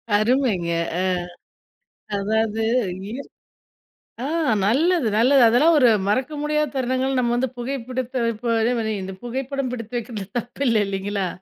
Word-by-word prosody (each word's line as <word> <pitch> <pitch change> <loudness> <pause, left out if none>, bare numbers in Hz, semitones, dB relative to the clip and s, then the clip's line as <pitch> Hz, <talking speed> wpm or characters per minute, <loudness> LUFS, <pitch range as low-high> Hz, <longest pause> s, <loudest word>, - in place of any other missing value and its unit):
அருமைங்க! 215 -5 +1 0.3
அ, - - +1 1.2
அதாவது 220 +2 0 0.5
இ, - - -6 1.1
ஆ, - - -2 0.4
நல்லது 305 - +2
நல்லது. 260 +4 +5
அதெல்லாம் 290 +9 +5
ஒரு 250 -3 +6 0.2
மறக்க 255 +8 0
முடியாத 300 -1 0
தருணங்கள் 260 +1 0
நம்ம 240 -1 +1
வந்து 255 +2 0
புகை 250 +3 -3
புடித்து 255 0 -3
வைப்போ, 230 +1 -2
அதே 230 +2 +2
மாரி 220 -1 -1
இந்த 190 +1 -6
புகைப்படம் 260 +2 -3
பிடித்து 240 0 -5
வெக்கிறது 220 -3 -6
தப்பு 245 +4 -6
இல்ல. 230 -2 +3
இல்லைங்களா? 195 0 -2
245 Hz, 135 wpm, -22 LUFS, 220-265 Hz, 1.2 s, ஒரு